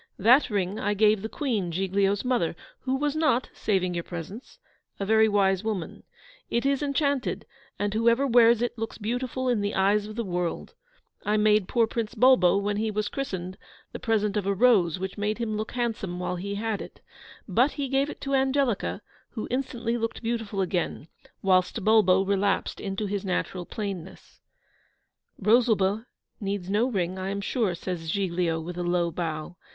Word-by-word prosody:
'That 245 +9 +5
ring 200 -1 -1
I 205 +1 0
gave 210 0 +4
the 220 - -4
Queen, 220 - -2
Giglio's 195 +4 0
mother, 240 -11 +1 0.2
who 260 0 -1
was 290 +2 -1
not, 305 -5 +2
saving 185 -4 0
your 170 -1 -2
presence, 185 - -8 0.4
a 200 - -1
very 220 +1 +4
wise 195 -2 +2
woman; 210 -6 -4 0.5
it 235 +2 0
is 275 0 +2
enchanted, 280 -2 0 0.3
and 205 0 -1
whoever 235 +4 +3
wears 235 -2 +5
it 240 - -2
looks 225 0 -4
beautiful 245 +4 -2
in 240 -4 +2
the 205 0 -2
eyes 205 +2 +2
of 215 - -8
the 235 - -2
world, 180 -2 -3 0.5
I 210 +1 +1
made 210 -2 +3
poor 235 -2 +3
Prince 225 -1 -4
Bulbo, 245 -8 +5
when 205 +1 -1
he 220 +1 0
was 210 0 -2
christened, 185 -9 -5 0.3
the - - -7
present 210 -2 0
of 205 -2 -1
a 200 - +1
rose 195 -7 +4
which 190 +2 -5
made 210 +1 -1
him 230 -2 -2
look 215 +1 -4
handsome 225 -7 -2
while 180 0 -2
he 200 +3 -4
had 215 0 -2
it; - - -11 0.5
but 245 +9 +2
he 280 -1 -3
gave 270 +2 +1
it - - -8
to 275 0 -3
Angelica, 265 -4 +1 0.3
who 220 - -5
instantly 240 -2 -1
looked 230 +1 -3
beautiful 225 -4 -2
again, 175 -3 -2 0.3
whilst 185 +2 +2
Bulbo 195 -3 +5
relapsed 200 0 0
into 195 +1 -3
his 200 -1 -2
natural 180 -1 -2
plainness.' 195 -4 -7 1.0
'Rosalba 220 0 +2 0.3
needs 195 -2 -3
no 215 +5 +2
ring, 185 -4 -2
I 190 +1 -3
am 200 +1 -2
sure,' 205 -3 0
says 170 -2 -5
Giglio, 175 -3 0
with 175 +2 -6
a - - -1
low 175 -1 +1
bow. 160 0 -4
210 Hz, 175 wpm, -26 LUFS, 190-235 Hz, 1.0 s, That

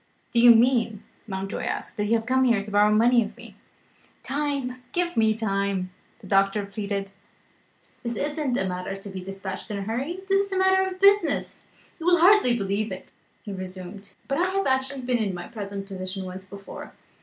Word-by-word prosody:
"Do 235 - +3
you 240 -1 +9
mean," 230 -3 +2 0.2
Mountjoy 195 0 -4
asked, - - -4
"that 210 - 0
you 225 +2 +3
have 225 -1 -1
come 260 +2 +3
here 220 -5 +2
to 210 - -8
borrow 205 +1 +4
money 235 +2 +5
of 215 +2 -9
me?" 235 -4 -12 0.7
"Time 275 -3 -2
give 350 0 0
me 220 -1 +3
time," 200 -3 -1 0.3
the - - -13
doctor 195 +1 +2
pleaded: 200 -1 -4 0.9
"this 235 -1 -3
is 290 +1 -2
not 280 -6 0
a 190 - 0
matter 180 +1 -4
to 195 +1 -9
be 190 -1 -6
dispatched 195 +1 -6
in 210 - -3
a 200 - -3
hurry; 265 - -3
this 390 0 +3
is - - -13
a - - 0
matter 380 0 +4
of 370 0 -9
business. 400 +1 +3 0.3
You 330 - -4
will 355 0 +6
hardly 350 -8 +5
believe 200 +1 -1
it," - - -8 0.3
he 205 - -6
resumed, 185 +1 -8
"but 275 +3 0
I 360 +1 +2
have 390 +1 0
actually 265 +1 0
been 250 -1 0
in 200 -4 -1
my 175 - -7
present 200 -3 -6
position, 190 0 -5
once 185 +1 -7
before." 200 +1 -10
220 Hz, 200 wpm, -25 LUFS, 195-265 Hz, 0.9 s, you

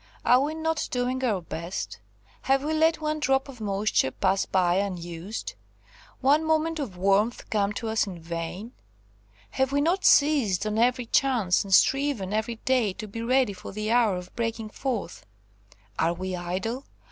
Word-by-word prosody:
Are 250 +1 +5
we 300 +3 -1
not 320 -1 -1
doing 250 +1 -1
our 205 -8 0
best? 170 +2 -5 0.5
Have 270 0 +3
we 310 +2 -1
let 320 +1 +2
one 305 0 -1
drop 270 -1 +1
of 255 -4 -11
moisture 200 -8 +1
pass 190 +7 0
by 180 -1 +2
unused, 180 0 -4 0.7
one 285 +4 +4
moment 320 +1 +1
of 220 -11 -5
warmth 200 +5 +1
come 205 -2 +1
to 225 - -4
us 220 -1 +1
in 185 -3 -6
vain? 170 +6 -5 0.8
have 265 0 0
we 285 - +2
not 345 +6 +1
seized 260 -11 +4
on 215 +1 -1
every 245 +1 +2
chance, 235 -8 +2
and 200 - -9
striven 260 -2 +3
every 220 +2 -1
day 235 -4 +1
to 215 +3 -7
be 225 +3 -6
ready 255 -2 +2
for 185 - -9
the 215 +2 -2
hour 230 -5 +3
of 180 0 -10
breaking 230 -2 -3
forth? 240 -10 -4 0.8
Are 165 +1 +2
we 185 +1 -4
idle? 190 +9 -4
225 Hz, 170 wpm, -26 LUFS, 190-270 Hz, 0.8 s, Are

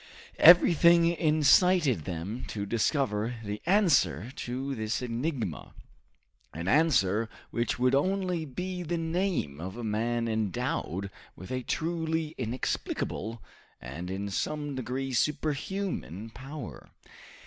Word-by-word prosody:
Everything 170 0 +7
incited 155 - +3
them 95 +7 -5
to 100 -2 -4
discover 115 0 0
the 105 0 -5
answer 130 - +3
to 130 +3 -4
this 110 0 -2
enigma, 120 - -3 0.8
an 85 +2 -4
answer 115 - +3 0.2
which 120 0 -1
would 125 +1 +2
only 180 +3 +1
be 180 +6 -5
the 170 0 -2
name 165 - -1
of 95 +5 -6
a 120 - -5
man 115 +2 -1
endowed 100 -3 -2 0.2
with 95 - -10
a 130 0 -1
truly 160 +2 -2
inexplicable, 115 -2 -3 0.4
and 75 +8 -7
in 95 +2 -3
some 145 +7 -2
degree 130 +1 -3
superhuman 150 - -2
power. 135 0 -9
130 Hz, 110 wpm, -29 LUFS, 105-160 Hz, 0.8 s, Everything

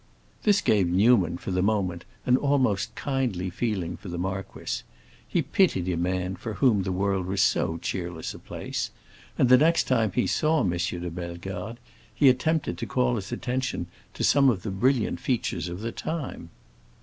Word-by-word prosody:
This 205 -2 +3
gave 100 -4 +3
Newman, 95 -1 +4
for 95 - -5
the 90 0 +1
moment, 95 -4 0 0.2
an 125 - +5
almost 130 -8 +1
kindly 120 -10 -1
feeling 90 -5 -2
for 90 - -9
the 85 - -4
marquis; 95 +2 -4 0.5
he 170 - +1
pitied 140 - +2
a 90 - 0
man 90 +2 -1
for 110 +2 -5
whom 120 -7 +3
the 95 0 -2
world 95 0 0
was 95 +1 +2
so 80 - +1
cheerless 85 -2 -4
a - - -10
place, - - -4 0.5
and 130 - +4
the 125 0 +7
next 165 +3 +4
time 115 -5 +1
he - - +2
saw 155 0 +2
M. 90 - +1
de 90 0 -2
Bellegarde 90 +5 -6 0.4
he 140 - +6
attempted 135 - +1
to - - -3
call 60 -1 +1
his - - -5
attention 130 -7 -2 0.3
to - - -3
some 140 -1 +5
of 100 -7 -1
the 105 - -3
brilliant 120 +4 +1
features 120 -7 -1
of 90 +3 -6
the 115 +1 -3
time. 150 - -5
100 Hz, 175 wpm, -26 LUFS, 90-130 Hz, 0.5 s, the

